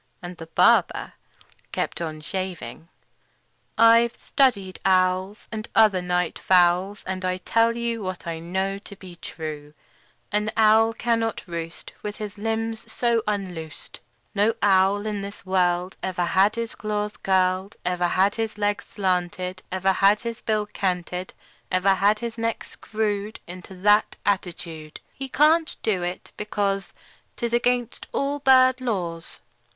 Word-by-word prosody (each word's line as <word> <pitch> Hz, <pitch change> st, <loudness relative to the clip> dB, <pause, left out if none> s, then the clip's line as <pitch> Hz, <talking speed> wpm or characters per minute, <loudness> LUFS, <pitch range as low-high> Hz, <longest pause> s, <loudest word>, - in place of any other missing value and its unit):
And 175 Hz, 0 st, -7 dB
the 165 Hz, -, -9 dB
barber 165 Hz, -, +3 dB, 0.6 s
kept -, -, -2 dB
on 155 Hz, -2 st, -4 dB
shaving. 185 Hz, -1 st, -5 dB, 0.9 s
"I've 230 Hz, +1 st, +6 dB
studied 200 Hz, -9 st, +1 dB
owls, 185 Hz, +2 st, +1 dB
And 220 Hz, 0 st, -5 dB
other 210 Hz, -5 st, +5 dB
night 180 Hz, -1 st, -1 dB
fowls, 185 Hz, +2 st, +3 dB
And 185 Hz, 0 st, -4 dB
I 185 Hz, 0 st, 0 dB
tell 230 Hz, +5 st, +2 dB
you 235 Hz, -1 st, -2 dB
What 185 Hz, -2 st, -5 dB
I 165 Hz, -1 st, -4 dB
know 190 Hz, +4 st, -2 dB
to 200 Hz, 0 st, -11 dB
be 185 Hz, -2 st, -12 dB
true: 150 Hz, -3 st, -7 dB, 0.6 s
An 210 Hz, +1 st, +1 dB
owl 220 Hz, +1 st, +5 dB
cannot 230 Hz, -2 st, 0 dB
roost 170 Hz, -1 st, -7 dB
With 210 Hz, 0 st, -5 dB
his 210 Hz, -2 st, -7 dB
limbs 225 Hz, +1 st, -3 dB
so 235 Hz, -1 st, +1 dB
unloosed; 180 Hz, -6 st, -5 dB, 0.3 s
No 210 Hz, +2 st, +2 dB
owl 195 Hz, +1 st, +4 dB
in 210 Hz, -2 st, -2 dB
this 200 Hz, +1 st, -8 dB
world 180 Hz, -1 st, +1 dB
Ever 180 Hz, -2 st, -1 dB
had 195 Hz, +5 st, +3 dB
his 230 Hz, 0 st, -3 dB
claws 210 Hz, 0 st, -3 dB
curled, 190 Hz, +1 st, +1 dB
Ever 180 Hz, 0 st, +1 dB
had 190 Hz, +3 st, +2 dB
his 225 Hz, -2 st, -3 dB
legs 205 Hz, +1 st, 0 dB
slanted, 185 Hz, -1 st, -2 dB
Ever 190 Hz, +1 st, +2 dB
had 200 Hz, +2 st, +4 dB
his 235 Hz, 0 st, -5 dB
bill 215 Hz, -1 st, 0 dB
canted, 180 Hz, -2 st, -3 dB, 0.4 s
Ever 185 Hz, +1 st, +3 dB
had 200 Hz, +3 st, +3 dB
his 230 Hz, +1 st, -5 dB
neck 230 Hz, 0 st, -1 dB
screwed 215 Hz, -1 st, -3 dB
Into 180 Hz, +2 st, -10 dB
that 210 Hz, +1 st, +4 dB
attitude. 170 Hz, -5 st, -3 dB
He 270 Hz, 0 st, -7 dB
can't 315 Hz, +4 st, +3 dB
do 195 Hz, -5 st, +1 dB
it, 175 Hz, +1 st, -5 dB
because 200 Hz, -2 st, -1 dB, 0.5 s
'T -, -, -2 dB
is 235 Hz, -, -3 dB
against 245 Hz, 0 st, 0 dB
all 280 Hz, +1 st, -1 dB
bird 260 Hz, -1 st, +5 dB
laws. 175 Hz, -9 st, -4 dB
200 Hz, 145 wpm, -24 LUFS, 180-220 Hz, 0.9 s, I've